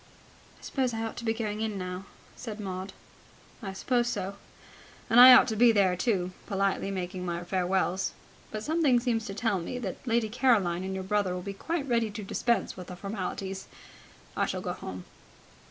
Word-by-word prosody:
"I - - -22
suppose 255 -4 -1
I 225 - -2
ought 225 - -4
to - - -6
be 225 - +1
going 215 -2 -3
in 220 -2 -2
now," 185 0 -5 0.3
said 220 -3 -7
Maud. 190 -1 -5 0.7
"I 195 -3 -4
suppose 240 +5 +1
so. 200 -4 -3 0.8
And 235 - +7
I 255 +1 +12
ought 250 - +8
to 220 - -1
be 235 +2 +6
there, 195 -4 +3
too, 185 -2 0 0.2
politely 195 0 0
making 185 -1 -4
my 175 -1 -3
farewells. 185 +1 0 0.4
But 215 0 -5
something 305 -5 +3
seems 235 -2 -1
to 195 - -6
tell 220 -4 0
me 175 +9 -5
that 205 -7 -4
Lady 230 -1 +2
Caroline 205 -8 +2
and 190 0 -3
your 190 - -3
brother 190 -1 0
will 180 - -5
be 200 - -5
quite 310 - -3
ready 235 -3 +1
to 210 0 -6
dispense 235 +4 0
with 180 -2 -9
the 180 - -7
formalities. 195 0 -5 0.7
I - - +1
shall - - -3
go - - -3
home." 90 -1 -7
200 Hz, 190 wpm, -29 LUFS, 185-235 Hz, 0.8 s, I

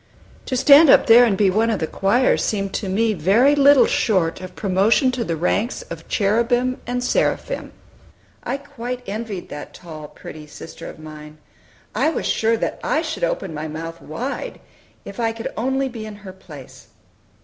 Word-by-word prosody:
To 255 - -1
stand 290 +4 +7
up - - +6
there 240 +1 +7
and 205 -5 +1
be 195 -2 +3
one 220 +4 +1
of 220 - 0
the 160 - -2
choir, 205 +10 +2
seemed 195 -2 -2
to 195 - -3
me 220 +3 +1
very 205 - +3
little 285 -1 +6
short 185 -6 0
of 185 0 -9
promotion 205 +7 +2
to 250 -2 -2
the 170 -6 -2
ranks 205 - -1
of - - -8
cherubim 235 +5 +1
and 245 0 -2
seraphim. - - -1 0.7
I 270 - -2
quite 250 -3 -7
envied 210 -2 -6
that 145 - -9
tall, 155 -4 -10
pretty 150 +1 -11
sister 150 - -10
of - - -11
mine. 155 -1 -11 0.6
I 265 +9 +2
was 325 - -3
sure 225 +1 +1
that - - -3
I - - 0
should - - -5
open - - -2
my 155 +1 -5
mouth 165 +2 -7
wide, 260 - -5 0.5
if 200 - -9
I 225 -1 +1
could 225 0 -6
only 265 +4 -1
be 230 -4 -7
in 215 - -9
her 190 - -8
place. 150 -8 -13
215 Hz, 180 wpm, -21 LUFS, 180-250 Hz, 0.7 s, stand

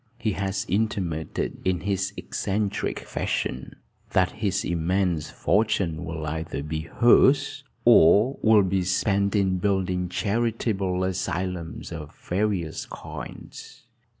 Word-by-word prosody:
He 110 - -1
has 95 +1 -2
intimated, 90 -6 -2
in 95 -1 0
his 100 0 -1
eccentric 100 0 -2
fashion, - - -3 0.4
that 95 -1 +3
his 100 -2 -1
immense 85 -1 0
fortune 95 -6 0
will 80 -2 -5
either 80 -1 -4
be 80 +1 -3 0.2
hers, 140 +4 +4 0.2
or 115 - +6
will 110 -2 +6
be 95 0 +1
spent 100 +2 +1
in 95 -2 +2
building 90 -2 0
charitable 100 -2 0
asylums 90 -2 -3
of 80 -3 -8
various 90 -4 -2
kinds. - - -9
95 Hz, 110 wpm, -25 LUFS, 85-105 Hz, 0.4 s, or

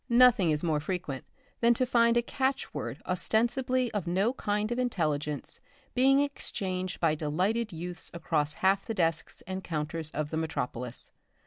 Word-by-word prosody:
Nothing 235 -7 +6
is 150 +1 +1
more 155 -3 +2
frequent 155 -4 -4 0.3
than 235 0 +5
to 255 - +2
find 235 -1 +4
a 240 - +3
catch 265 +2 -1
word - - -4
ostensibly 240 +6 +1
of 205 -5 -2
no 195 +7 +2
kind 210 -2 -1
of 240 - -1
intelligence 150 - -1 0.3
being 270 +2 +5
exchanged 185 -10 -2
by 165 -3 +3
delighted 185 +10 0
youths 175 +1 -5
across 155 -3 0
half 195 +1 +4
the 225 - -4
desks 165 -4 0
and 190 +1 -4
counters 155 0 -3
of 150 -1 -3
the 160 - -1
metropolis. 125 -6 -2
185 Hz, 155 wpm, -29 LUFS, 160-235 Hz, 0.3 s, Nothing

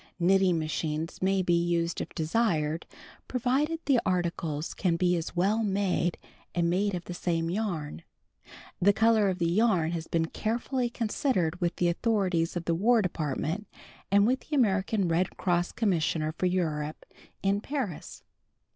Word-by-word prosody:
Knitting 185 0 +4
machines 155 0 -3
may 190 0 +2
be 175 - +2
used 170 0 +1
if - - -5
desired, 160 -3 0 0.4
provided 270 +6 0
the 265 -4 +4
articles 170 -4 -1
can 180 -4 0
be 180 +1 +2
as 170 +1 -4
well 200 +6 +2
made 195 -4 0 0.4
and 170 -1 +2
made 200 +2 +1
of 175 - -5
the 180 - -6
same 165 -1 -1
yarn. 170 - -3 0.8
The 200 +3 +5
color 220 -2 +4
of 185 - -2
the 170 - 0
yarn 180 -3 +2
has 165 -2 -4
been 165 -1 +1
carefully 240 +7 -2
considered 215 - -1
with 175 0 0
the 175 - +1
authorities 180 -3 0
of 175 -1 -3
the 170 - +1
War 220 +6 +3
Department 165 +3 -2 0.4
and 200 +1 +5
with 255 +6 0
the 305 - -1
American 200 -5 +2
Red 170 +2 0
Cross 175 -1 0
Commissioner 165 -7 0
for 185 - 0
Europe, 155 -4 -2 0.4
in 200 +1 +1
Paris. 255 - -5
180 Hz, 155 wpm, -28 LUFS, 165-210 Hz, 0.8 s, The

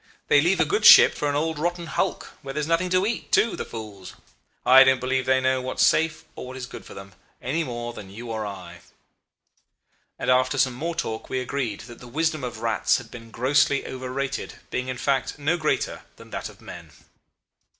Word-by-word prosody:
They 145 - +6
leave 175 +5 +2
a - - +4
good 420 +2 -1
ship - - +9
for 145 - -2
an 145 - -1
old 160 +1 -1
rotten 175 +1 -2
hulk, - - -2
where 135 0 -7
there - - -1
is 150 - -1
nothing 165 +3 0
to 185 +1 +2
eat, 230 +2 -3
too, 230 - +3
the - - -4
fools!... 105 -4 -9 0.5
I 130 +1 +9
don't 130 -1 +3
believe 130 +1 -1
they 130 0 +4
know 130 0 +1
what 130 0 -5
is - - +6
safe 160 -1 +1
or - - -8
what 130 +1 -8
is 125 - -5
good 125 - -11
for - - -12
them, 95 0 -11 0.3
any 155 +6 -1
more 120 -3 -5
than 100 -4 -10
you 115 +4 -8
or 110 -1 -3
I.' 100 -2 -8 1.4
"And - - 0
after 130 +2 +2
some 130 -1 +2
more 165 +7 -4
talk 110 -9 -4
we 130 - -1
agreed 125 -4 -3
that 120 - -12
the 125 - -12
wisdom 155 +2 -1
of 120 -3 -6
rats 115 -2 +2
had 120 -3 -10
been 115 -1 -11
grossly 140 +4 +2
overrated, 130 +1 -4 0.2
being 125 0 -2
in 130 0 -4
fact 135 0 -1
no 145 +4 0
greater 155 -3 -1
than - - -15
that - - -5
of - - -17
men. - - -10
130 Hz, 215 wpm, -24 LUFS, 120-150 Hz, 1.4 s, ship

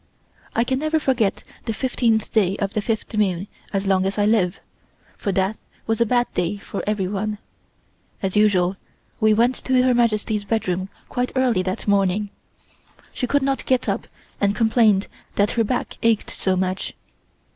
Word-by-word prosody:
I 230 - +3
can 260 +2 0
never 310 +2 +1
forget 245 -8 +1 0.2
the 225 - -1
fifteenth 235 -3 0
day 200 -3 +2
of 200 -1 -2
the 215 - 0
fifth 220 +1 -2
moon 195 -3 +1 0.2
as 195 -1 -1
long 190 -1 +2
as 195 - -3
I 205 - +3
live, 205 -4 +2 0.6
for 200 - -2
that 190 +3 0 0.3
was 225 +1 0
a 235 - +4
bad 245 +1 +3
day 180 +3 -1
for 200 - -5
everyone. 210 +1 -1 0.8
As 190 0 -2
usual 195 -3 +3 0.4
we 215 0 +4
went 240 +3 +4
to 255 -1 +3
Her 255 -1 +4
Majesty's 220 -3 +1
bedroom 190 -3 -1 0.2
quite 250 0 -2
early 250 -7 +3
that 185 +2 -3
morning. 200 0 +2 0.8
She 250 - -2
could 285 +3 +2
not 270 0 0
get 255 -1 +2
up - - -1 0.3
and 200 0 +2
complained 220 -3 +3 0.3
that 205 +1 +2
her 230 - +2
back 245 +3 -2
ached 230 -2 +2
so 190 -1 0
much. 185 0 -2
210 Hz, 165 wpm, -22 LUFS, 195-235 Hz, 0.8 s, a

